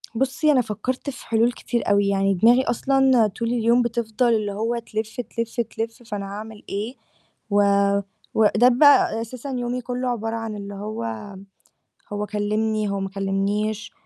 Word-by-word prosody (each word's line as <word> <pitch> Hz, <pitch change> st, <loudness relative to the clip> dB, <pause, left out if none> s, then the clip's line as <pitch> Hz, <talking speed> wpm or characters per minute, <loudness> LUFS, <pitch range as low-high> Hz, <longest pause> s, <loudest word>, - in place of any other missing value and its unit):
بُصّي 270 Hz, +5 st, +2 dB
أنا 265 Hz, -3 st, +4 dB
فكّرت 250 Hz, +5 st, -3 dB
في 265 Hz, -, -9 dB
حلول 230 Hz, +1 st, +3 dB
كتير 240 Hz, -2 st, -3 dB
أوي، 200 Hz, 0 st, +3 dB
يعني 195 Hz, 0 st, +2 dB
دماغي 235 Hz, +7 st, +5 dB
أصلًا 260 Hz, -1 st, +3 dB
طول 230 Hz, +3 st, -4 dB
اليوم 235 Hz, +1 st, +3 dB
بتفضل 235 Hz, 0 st, 0 dB
اللي 210 Hz, -2 st, 0 dB
هو 225 Hz, +4 st, -1 dB
تلِف، 220 Hz, +1 st, -4 dB
تلِف، 230 Hz, 0 st, -3 dB
تلِف 230 Hz, +2 st, -5 dB
فأنا 205 Hz, -3 st, -5 dB
هاعمل 210 Hz, +2 st, -8 dB
إيه، 215 Hz, +6 st, -3 dB, 0.5 s
و 205 Hz, 0 st, +3 dB, 0.7 s
وده 220 Hz, +2 st, +4 dB
بقى 255 Hz, -3 st, +5 dB
أساسًا 250 Hz, +4 st, -7 dB
يومي 245 Hz, +1 st, -2 dB
كلّه 250 Hz, +1 st, -3 dB
عبارة 225 Hz, -1 st, -2 dB
عن 225 Hz, -1 st, -4 dB
اللي 200 Hz, 0 st, -7 dB
هو، 200 Hz, -, -5 dB, 0.8 s
هو 205 Hz, 0 st, -2 dB
كلّمني، 215 Hz, +1 st, -1 dB
هو 200 Hz, 0 st, -2 dB
ما 195 Hz, -, -2 dB
كلّمنيش، 200 Hz, +2 st, -2 dB
225 Hz, 155 wpm, -23 LUFS, 205-240 Hz, 0.8 s, دماغي